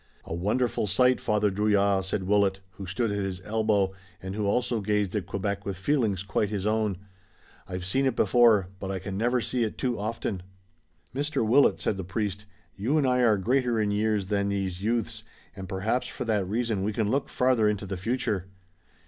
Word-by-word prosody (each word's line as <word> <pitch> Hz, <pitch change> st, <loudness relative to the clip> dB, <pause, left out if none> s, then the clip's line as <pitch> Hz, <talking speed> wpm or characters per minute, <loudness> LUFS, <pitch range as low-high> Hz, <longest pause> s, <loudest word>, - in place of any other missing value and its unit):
"A -, -, -5 dB
wonderful 105 Hz, +6 st, 0 dB
sight, 125 Hz, +7 st, +3 dB
Father 105 Hz, -2 st, +1 dB
Drouillard," 100 Hz, -1 st, +2 dB
said 95 Hz, 0 st, -2 dB
Willet, 100 Hz, 0 st, +2 dB
who 95 Hz, +1 st, -9 dB
stood 110 Hz, +5 st, -1 dB
at 100 Hz, -, -1 dB
his 95 Hz, -2 st, -3 dB
elbow 105 Hz, -2 st, +1 dB, 0.3 s
and 95 Hz, +2 st, -6 dB
who 105 Hz, 0 st, -1 dB
also 120 Hz, +1 st, +1 dB
gazed 105 Hz, -1 st, 0 dB
at 95 Hz, -5 st, -2 dB
Quebec 100 Hz, +1 st, -2 dB
with 100 Hz, -2 st, -4 dB
feelings 105 Hz, -4 st, 0 dB
quite 100 Hz, +1 st, 0 dB
his 100 Hz, -2 st, -3 dB
own. 105 Hz, -3 st, +1 dB, 0.7 s
"I've 90 Hz, -1 st, -5 dB
seen 135 Hz, +8 st, +2 dB
it 130 Hz, -, 0 dB
before, 115 Hz, -8 st, +4 dB
but 95 Hz, -, -5 dB
I 95 Hz, -, -2 dB
can 95 Hz, +1 st, -5 dB
never 120 Hz, +5 st, +1 dB
see 120 Hz, +2 st, 0 dB
it 110 Hz, -, -3 dB
too 125 Hz, -4 st, -1 dB
often." 110 Hz, -3 st, -3 dB, 0.7 s
"Mr. 145 Hz, -2 st, -1 dB
Willet," 135 Hz, +6 st, +4 dB
said 100 Hz, -, -1 dB
the 95 Hz, -, -4 dB
priest, 105 Hz, +1 st, -3 dB, 0.3 s
"you 120 Hz, +10 st, 0 dB
and 145 Hz, -, +2 dB
I 125 Hz, -1 st, +2 dB
are 115 Hz, -4 st, +4 dB
greater 120 Hz, +3 st, +1 dB
in 105 Hz, -1 st, +1 dB
years 105 Hz, -1 st, +1 dB
than 100 Hz, 0 st, 0 dB
these 95 Hz, -2 st, -2 dB
youths, 115 Hz, +2 st, -1 dB, 0.3 s
and 95 Hz, -1 st, -8 dB
perhaps 105 Hz, +6 st, -1 dB
for 125 Hz, -, -5 dB
that 105 Hz, -4 st, 0 dB
reason 110 Hz, -2 st, 0 dB
we 105 Hz, +2 st, -1 dB
can 110 Hz, 0 st, 0 dB
look 140 Hz, +2 st, 0 dB
farther 125 Hz, -4 st, +3 dB
into 105 Hz, -1 st, -2 dB
the 95 Hz, 0 st, -4 dB
future. 100 Hz, -1 st, -2 dB
105 Hz, 195 wpm, -27 LUFS, 95-115 Hz, 0.7 s, before